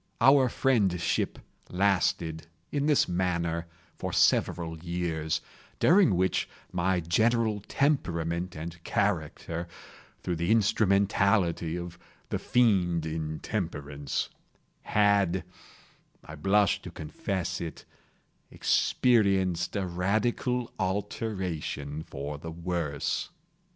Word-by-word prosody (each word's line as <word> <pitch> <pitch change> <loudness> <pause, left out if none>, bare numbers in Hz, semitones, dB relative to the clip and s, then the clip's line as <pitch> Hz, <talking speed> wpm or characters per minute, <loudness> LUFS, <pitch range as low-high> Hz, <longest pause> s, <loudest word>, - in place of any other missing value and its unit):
Our 135 -1 +6
friendship 100 -11 +1 0.3
lasted, 90 -4 +1 0.2
in 145 0 0
this 150 -2 +4
manner, 85 -2 -1 0.3
for - - -3
several 80 -2 +2
years, 85 -2 -2 0.4
during 180 - +5
which 95 +1 +1 0.2
my 90 0 +1
general 110 +5 +2
temperament 85 - 0
and 85 +2 -7
character—through 85 -1 -3
the 85 +3 -1
instrumentality 100 -5 +2
of 85 -1 -7 0.3
the - - -1
Fiend 95 -9 +2
Intemperance—had 80 +4 -2 0.8
(I 75 - -9
blush 100 +5 +2
to - - -8
confess 85 +4 -4
it) 80 -3 -6 0.6
experienced 95 -8 +2
a 100 -2 0
radical 110 +7 0
alteration 95 -7 -3
for 70 -1 -6
the 80 - -7
worse. 85 -3 -2
90 Hz, 85 wpm, -28 LUFS, 85-105 Hz, 0.8 s, Our